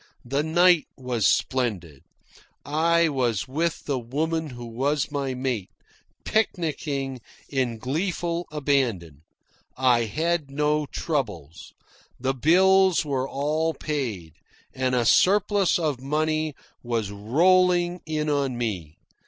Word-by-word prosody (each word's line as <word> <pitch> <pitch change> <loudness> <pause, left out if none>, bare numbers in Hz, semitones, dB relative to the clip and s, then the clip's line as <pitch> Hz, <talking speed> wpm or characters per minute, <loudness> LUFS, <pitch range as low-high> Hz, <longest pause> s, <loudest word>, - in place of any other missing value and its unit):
The 140 +4 0
night 175 +1 +4
was 125 -5 0
splendid. 95 - -1 0.6
I 165 +3 +2
was 125 -8 -1
with 160 +5 -2
the 140 -3 -1
woman 155 +6 -2
who 120 -2 -8
was 135 +6 -1
my 140 -3 -2
mate, 125 -7 -2 0.6
picnicking 145 - -1 0.3
in 130 -4 -1
gleeful 170 - -2
abandon. 125 - -1 0.6
I 125 -3 +3
had 160 +5 -1
no 150 +1 0
troubles. 105 - -4 0.5
The 130 +2 0
bills 185 +5 +4
were 135 -2 -2
all 155 +3 -1
paid, 115 - -4 0.4
and 130 -1 0
a 120 -1 +1
surplus 200 - +4
of 150 -7 -2
money 155 +1 -1 0.3
was 115 -4 -2
rolling 175 - +2
in 155 -1 -2
on 140 -4 0
me. 95 -10 -4
140 Hz, 110 wpm, -25 LUFS, 120-160 Hz, 0.6 s, night